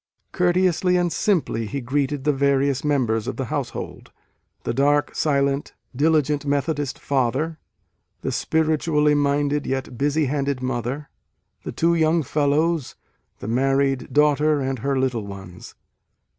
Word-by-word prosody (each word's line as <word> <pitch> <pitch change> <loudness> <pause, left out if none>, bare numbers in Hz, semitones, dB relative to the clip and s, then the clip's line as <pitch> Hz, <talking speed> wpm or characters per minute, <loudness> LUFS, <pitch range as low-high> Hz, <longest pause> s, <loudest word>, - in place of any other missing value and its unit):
Courteously 180 0 +2
and 175 -2 0
simply 165 - 0
he 140 +5 -3
greeted 140 +2 -1
the 150 0 +2
various 140 -1 +1
members 125 -7 0
of - - -4
the - - -2
household, - - -5 0.5
the - - -2
dark, 145 +3 +2
silent, 140 -1 0 0.2
diligent 150 0 +2
Methodist 145 0 -1
father, 140 +4 -1 0.6
the - - -2
spiritually 155 -1 +1
minded 145 0 +1
yet 130 -2 -3
busy 145 +2 +1
handed 140 -1 -1
mother, 130 +3 -3 0.5
the - - -5
two 170 +1 +2
young 160 0 +2
fellows, 150 +2 0 0.5
the - - -5
married 135 +2 +1
daughter 150 0 +3
and 135 -2 -2
her 135 +3 -1
little 125 -5 -1
ones. 95 -3 -10
140 Hz, 130 wpm, -23 LUFS, 135-150 Hz, 0.6 s, daughter